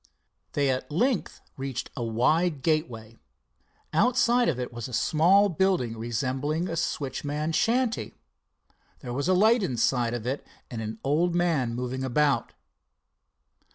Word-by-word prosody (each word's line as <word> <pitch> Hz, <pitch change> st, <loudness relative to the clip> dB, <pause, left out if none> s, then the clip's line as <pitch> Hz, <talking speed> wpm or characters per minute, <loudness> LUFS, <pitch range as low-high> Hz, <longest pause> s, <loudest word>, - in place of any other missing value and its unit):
They 140 Hz, -2 st, +2 dB
at 130 Hz, 0 st, -3 dB
length 235 Hz, -, 0 dB, 0.2 s
reached 135 Hz, -2 st, -4 dB
a 120 Hz, -, -3 dB
wide 145 Hz, +7 st, +1 dB
gateway. 120 Hz, -9 st, -1 dB, 0.8 s
Outside 240 Hz, +5 st, +3 dB
of 130 Hz, -6 st, -2 dB
it 125 Hz, -1 st, -4 dB
was 120 Hz, -1 st, -5 dB
a 125 Hz, -, -10 dB
small 180 Hz, -, +4 dB
building 180 Hz, -, 0 dB
resembling 130 Hz, +8 st, -2 dB
a 165 Hz, -, -3 dB
switchman's 150 Hz, 0 st, -2 dB
shanty. 240 Hz, 0 st, 0 dB, 0.9 s
There 120 Hz, -, -6 dB
was 140 Hz, +5 st, -2 dB
a 185 Hz, -, +4 dB
light 220 Hz, +5 st, +4 dB
inside 120 Hz, -, 0 dB
of 120 Hz, -2 st, -5 dB
it 135 Hz, +3 st, -2 dB, 0.3 s
and 115 Hz, -2 st, -4 dB
an 110 Hz, 0 st, -5 dB
old 165 Hz, +5 st, +1 dB
man 155 Hz, -9 st, +1 dB
moving 125 Hz, +1 st, -3 dB
about. 140 Hz, +2 st, +1 dB
145 Hz, 135 wpm, -27 LUFS, 125-175 Hz, 0.9 s, small